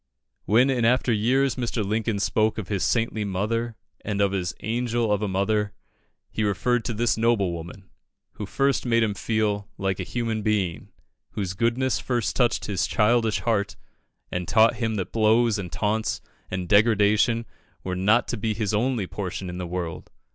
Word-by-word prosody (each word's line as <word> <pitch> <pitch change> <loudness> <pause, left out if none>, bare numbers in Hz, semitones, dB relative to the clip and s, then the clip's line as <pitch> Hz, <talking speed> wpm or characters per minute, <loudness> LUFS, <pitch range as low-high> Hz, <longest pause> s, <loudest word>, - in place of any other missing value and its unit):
"When 120 +7 +4
in 125 -3 0
after 125 +1 +3
years 130 +6 +2
Mr. 120 -3 -2
Lincoln 110 +1 -1
spoke 110 +2 +1
of 105 -5 -5
his 100 -3 -1
'saintly 115 -2 0
mother' 110 +4 -2 0.3
and 105 -2 -2
of 100 -1 +3
his 90 -2 -2
'angel 115 0 -1
of 105 0 +1
a 105 - 0
mother,' 100 +2 0 0.6
he 110 - -1
referred 115 +4 +1
to 115 - -2
this 120 +1 +1
noble 110 -5 +2
woman, 85 +4 -8 0.4
who 105 - -7
first 135 +5 +1
made 115 -2 +2
him 105 -2 0
feel 105 -1 -1
'like 95 -1 -1
a - - -1
human 115 +1 -2
being' 100 -6 -1 0.4
whose 95 -3 -3
goodness 120 +5 0
first 120 -4 -1
touched 120 -3 +1
his 100 -3 -1
childish 110 0 +2
heart, 105 -4 0 0.6
and 90 -1 -3
taught 110 +2 +4
him 115 -2 -1
that 95 -4 -3
blows 110 0 +3
and 90 -3 -6
taunts 110 +1 -1 0.3
and 95 -1 -3
degradation 110 +2 +3 0.4
were 90 -1 -3
not 105 +6 +3
to 120 - -2
be 110 +1 -1
his 110 -2 -1
only 115 -1 +1
portion 95 -1 -5
in 90 - -6
the 90 - -4
world." 85 -2 -5
110 Hz, 175 wpm, -25 LUFS, 100-115 Hz, 0.6 s, When